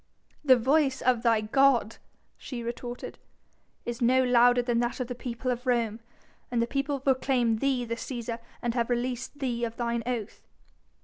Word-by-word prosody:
'" -, -, -37 dB
"The -, -, +11 dB
voice 270 Hz, +2 st, +2 dB
of 250 Hz, -2 st, +3 dB
thy 230 Hz, -2 st, +3 dB
god," 240 Hz, 0 st, +3 dB, 0.4 s
she 240 Hz, -3 st, -7 dB
retorted, 240 Hz, +1 st, -6 dB, 0.7 s
"is 240 Hz, 0 st, -4 dB
no 255 Hz, +2 st, +4 dB
louder 245 Hz, 0 st, +5 dB
than 240 Hz, -1 st, +1 dB
that 240 Hz, +2 st, -1 dB
of 255 Hz, -, -1 dB
the 250 Hz, -, -4 dB
people 245 Hz, +1 st, -4 dB
of 250 Hz, +1 st, -4 dB
Rome, 230 Hz, -3 st, +1 dB, 0.5 s
and 240 Hz, -, 0 dB
the 230 Hz, -, +3 dB
people 275 Hz, +3 st, -2 dB
proclaim 255 Hz, -3 st, +1 dB
thee 260 Hz, 0 st, 0 dB
the 230 Hz, -, -3 dB
Cæsar 235 Hz, -1 st, -5 dB, 0.2 s
and 240 Hz, -1 st, 0 dB
have 235 Hz, -1 st, 0 dB
released 250 Hz, +3 st, -2 dB
thee 245 Hz, -4 st, -2 dB
of 230 Hz, -1 st, -3 dB
thine 235 Hz, -1 st, -1 dB
oath." 235 Hz, -5 st, -4 dB
245 Hz, 175 wpm, -28 LUFS, 235-255 Hz, 0.7 s, The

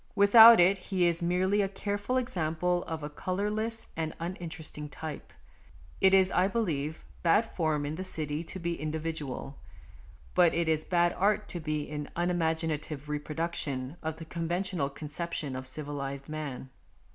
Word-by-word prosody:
Without 220 Hz, +2 st, +9 dB
it 185 Hz, +2 st, +5 dB
he 180 Hz, -1 st, 0 dB
is 170 Hz, 0 st, +2 dB
merely 185 Hz, +4 st, +2 dB
a 195 Hz, -, 0 dB
careful 205 Hz, +5 st, -2 dB
example 180 Hz, -6 st, 0 dB
of 160 Hz, -2 st, -5 dB
a -, -, -2 dB
colourless 210 Hz, +7 st, -2 dB
and 160 Hz, -1 st, -3 dB
uninteresting 165 Hz, -3 st, -5 dB
type. 155 Hz, +1 st, -7 dB, 0.7 s
It 190 Hz, -, +6 dB
is, 190 Hz, -1 st, +5 dB
I 180 Hz, +1 st, +3 dB
believe, 160 Hz, -8 st, -2 dB, 0.2 s
bad 180 Hz, +7 st, +4 dB
form 155 Hz, -8 st, -1 dB
in 145 Hz, -, -3 dB
the 180 Hz, +4 st, -4 dB
City 155 Hz, -3 st, -3 dB
to 190 Hz, -, -7 dB
be 170 Hz, -2 st, -3 dB
individual; 155 Hz, -3 st, -4 dB, 0.7 s
but 175 Hz, -2 st, +5 dB
it 170 Hz, -1 st, +1 dB
is 155 Hz, -1 st, +1 dB
bad 175 Hz, -1 st, +2 dB
art 210 Hz, +2 st, +1 dB
to 175 Hz, -, -4 dB
be 155 Hz, -2 st, -2 dB
an 150 Hz, -1 st, -4 dB
unimaginative 160 Hz, -4 st, -1 dB
reproduction 150 Hz, -2 st, -3 dB
of 160 Hz, -1 st, -3 dB
the 160 Hz, -, -9 dB
conventional 170 Hz, -1 st, -2 dB
conception 150 Hz, -1 st, -4 dB
of 130 Hz, 0 st, -5 dB
civilized 140 Hz, -1 st, -5 dB
man. 145 Hz, -4 st, -6 dB
165 Hz, 150 wpm, -30 LUFS, 150-185 Hz, 0.7 s, Without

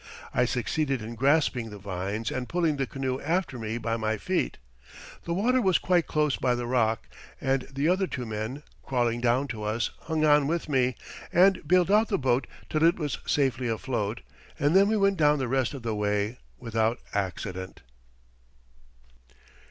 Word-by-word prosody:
I 125 Hz, -, +3 dB
succeeded 130 Hz, +1 st, -1 dB
in 115 Hz, +2 st, -6 dB
grasping 135 Hz, -2 st, +2 dB
the 105 Hz, -, -9 dB
vines 100 Hz, +3 st, -3 dB
and 125 Hz, -1 st, -4 dB
pulling 165 Hz, -4 st, +1 dB
the 135 Hz, -1 st, -1 dB
canoe 130 Hz, -1 st, -3 dB
after 165 Hz, -5 st, -1 dB
me 110 Hz, +1 st, -3 dB
by 115 Hz, -1 st, -2 dB
my 110 Hz, -1 st, -1 dB
feet. -, -, -1 dB, 0.7 s
The 170 Hz, -, -1 dB
water 250 Hz, +7 st, +2 dB
was 190 Hz, -5 st, +4 dB
quite 175 Hz, -3 st, +1 dB
close 150 Hz, -2 st, +1 dB
by 125 Hz, -1 st, +1 dB
the 120 Hz, 0 st, -3 dB
rock, 115 Hz, -3 st, +1 dB, 0.3 s
and 135 Hz, -1 st, 0 dB
the 140 Hz, +3 st, 0 dB
other 185 Hz, +2 st, +2 dB
two 125 Hz, -7 st, -4 dB
men, 110 Hz, +6 st, -4 dB, 0.2 s
crawling 120 Hz, -2 st, 0 dB
down 125 Hz, +3 st, +2 dB
to 110 Hz, -2 st, -5 dB
us, 110 Hz, +2 st, -1 dB
hung 160 Hz, -1 st, +1 dB
on 145 Hz, -2 st, +5 dB
with 170 Hz, +2 st, -1 dB
me, 130 Hz, -4 st, +1 dB, 0.4 s
and 190 Hz, +2 st, +5 dB
bailed 180 Hz, +2 st, +4 dB
out 215 Hz, +2 st, +5 dB
the 195 Hz, -, 0 dB
boat 130 Hz, -1 st, +1 dB, 0.2 s
till 155 Hz, 0 st, 0 dB
it 170 Hz, +1 st, +5 dB
was 150 Hz, -5 st, -3 dB
safely 130 Hz, -3 st, +1 dB
afloat, 115 Hz, -2 st, -2 dB, 0.4 s
and 145 Hz, +5 st, +2 dB
then 195 Hz, +1 st, +6 dB
we 220 Hz, +1 st, +2 dB
went 195 Hz, -1 st, +2 dB
down 150 Hz, -1 st, +4 dB
the 130 Hz, -3 st, -1 dB
rest 130 Hz, +2 st, 0 dB
of 130 Hz, -, -8 dB
the 115 Hz, -1 st, -1 dB
way 105 Hz, +2 st, -1 dB, 0.2 s
without 115 Hz, -1 st, 0 dB, 0.2 s
accident." 95 Hz, -4 st, -4 dB
130 Hz, 175 wpm, -27 LUFS, 115-155 Hz, 0.7 s, then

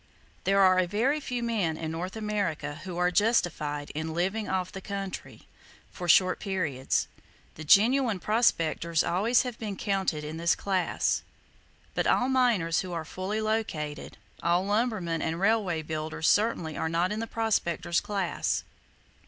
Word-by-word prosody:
There 195 Hz, +1 st, +3 dB
are 185 Hz, -1 st, +6 dB
a 185 Hz, -, +2 dB
very 240 Hz, -, +1 dB
few 250 Hz, -4 st, -3 dB
men 200 Hz, -9 st, 0 dB
in 160 Hz, -1 st, -4 dB
North 180 Hz, +5 st, -4 dB
America 205 Hz, -9 st, -2 dB
who 180 Hz, -2 st, -5 dB
are 180 Hz, 0 st, +2 dB
justified 165 Hz, -9 st, +1 dB
in 160 Hz, +1 st, -4 dB
"living 195 Hz, +5 st, -1 dB
off 185 Hz, -1 st, -1 dB
the 190 Hz, -, -7 dB
country," 195 Hz, -1 st, -6 dB, 0.5 s
for 175 Hz, -1 st, -6 dB
short 185 Hz, +2 st, +5 dB
periods. 165 Hz, -10 st, -1 dB, 0.5 s
The 160 Hz, -, -9 dB
genuine 225 Hz, -, +4 dB
prospectors 170 Hz, -6 st, +1 dB
always 210 Hz, +8 st, +2 dB
have 250 Hz, -3 st, -6 dB
been 210 Hz, -3 st, -4 dB
counted 190 Hz, -7 st, -1 dB
in 155 Hz, +2 st, -6 dB
this 170 Hz, +1 st, +2 dB
class; 190 Hz, -2 st, 0 dB, 0.7 s
but -, -, 0 dB
all 250 Hz, -, +3 dB
miners 235 Hz, -11 st, +2 dB
who 185 Hz, -2 st, -4 dB
are 165 Hz, -2 st, -3 dB
fully 190 Hz, +6 st, -3 dB
located, 210 Hz, -9 st, -3 dB, 0.2 s
all 175 Hz, +2 st, +2 dB
lumbermen 205 Hz, -6 st, 0 dB
and 165 Hz, +1 st, -2 dB
railway 195 Hz, -5 st, +1 dB
builders 155 Hz, +1 st, -3 dB
certainly 205 Hz, -7 st, +2 dB
are 160 Hz, -, -1 dB
not 170 Hz, +3 st, +1 dB
in 210 Hz, -, -2 dB
the 230 Hz, -, -3 dB
prospector's 175 Hz, -7 st, 0 dB
class. 195 Hz, -4 st, -1 dB
185 Hz, 155 wpm, -28 LUFS, 165-215 Hz, 0.7 s, are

